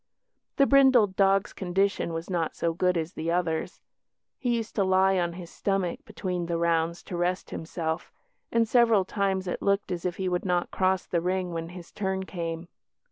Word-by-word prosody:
The 275 - +5
brindled 260 -8 +5
dog's 195 0 +3
condition 190 -1 0
was 165 +1 -4
not 170 -4 -1
so 165 -1 0
good 180 +1 +1
as 165 +1 -3
the 160 +1 -3
other's. 165 -2 -1 0.6
He 245 -2 +1
used 225 -2 -4
to 200 - +4
lie 190 0 +3
on 170 -1 -1
his 175 -1 -9
stomach 195 -3 -1
between 180 -4 -3
the 170 -1 -1
rounds 170 0 0
to 180 - -6
rest 175 +1 -1
himself, 160 0 -4 0.4
and 230 -1 +3
several 225 -4 +4
times 195 -1 -1
it 180 - -3
looked 200 -1 +1
as 175 -2 -3
if 180 -1 -1
he 190 - -2
would 180 -1 0
not 180 -2 0
cross 185 0 +1
the 170 - -1
ring 180 0 -1
when 165 0 -4
his 175 -1 -10
turn 190 -1 -2
came. 170 -2 -5
180 Hz, 190 wpm, -27 LUFS, 170-195 Hz, 0.6 s, The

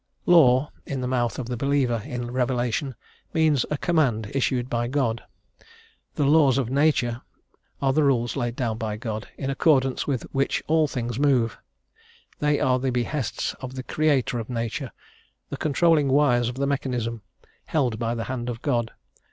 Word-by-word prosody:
"Law," 145 -5 +5
in 140 -2 -4
the 125 - -2
mouth 120 -2 0
of 130 - -4
the 125 +1 -4
believer 130 -3 +1
in 120 0 -5
revelation, 125 +1 -1 0.4
means 155 -5 +3
a 150 - -1
command 130 -11 +1
issued 130 -2 0
by 120 -1 -1
God; 120 -4 0 0.9
the 145 - +1
"laws 140 -3 +5
of 130 -3 -1
Nature" 135 -4 +2 0.6
are 135 -1 +3
the 155 - +3
rules 120 -4 +1
laid 120 -4 -2
down 115 -4 -2
by 110 -2 -3
God, 110 -1 -5
in 135 -1 -2
accordance 135 -2 +2
with 135 -5 -1
which 135 0 0
all 160 0 +3
things 120 -3 -4
move; 130 -6 +2 0.8
they 150 -1 +2
are 130 0 +2
the 130 +1 -1
behests 125 +1 -2
of 130 0 -7
the 130 - -5
Creator 140 -5 +1
of 115 - -6
Nature, 115 +2 -3 0.6
the - - -3
controlling 155 0 +3
wires 130 -4 +3
of 125 - -6
the 140 +1 -1
mechanism, 125 -5 -2 0.4
held 125 -8 0
by 115 0 -1
the 115 - -3
hand 125 -1 -4
of 115 0 -6
God. 120 -6 0
130 Hz, 170 wpm, -25 LUFS, 120-140 Hz, 0.9 s, Law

